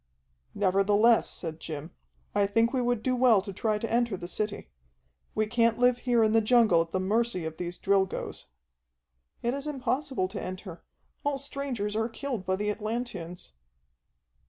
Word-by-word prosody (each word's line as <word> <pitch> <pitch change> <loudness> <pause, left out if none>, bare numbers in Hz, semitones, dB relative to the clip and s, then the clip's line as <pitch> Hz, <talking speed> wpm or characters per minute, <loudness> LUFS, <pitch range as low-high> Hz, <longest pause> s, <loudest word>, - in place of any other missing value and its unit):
"Nevertheless," 205 +3 +4
said 160 -2 -6
Jim, 155 0 -6 0.4
"I 205 -1 +3
think 225 +4 +2
we 260 - +1
would 240 -2 0
do 255 -1 +1
well 245 -4 +5
to 200 - -6
try 215 +2 0
to 230 +2 -4
enter 235 -4 +1
the 175 - -7
city. 210 +3 -3 0.6
We 215 - +2
can't 230 +1 +2
live 245 0 +3
here 240 -2 +2
in 215 - +3
the 225 0 +4
jungle 215 -6 +5
at 165 0 -4
the 185 - 0
mercy 205 -2 0
of 160 0 -5
these 175 0 -4
Drilgoes." 195 -1 0 1.0
"It 240 +1 +1
is 280 +2 -4
impossible 265 -5 -1
to - - -5
enter. 185 -1 -7 0.4
All 285 -2 0
strangers 265 -7 -3
are 225 +1 0
killed 240 -5 -5
by 185 - +2
the 210 +2 -1
Atlanteans." 210 - -5
215 Hz, 165 wpm, -28 LUFS, 190-240 Hz, 1.0 s, well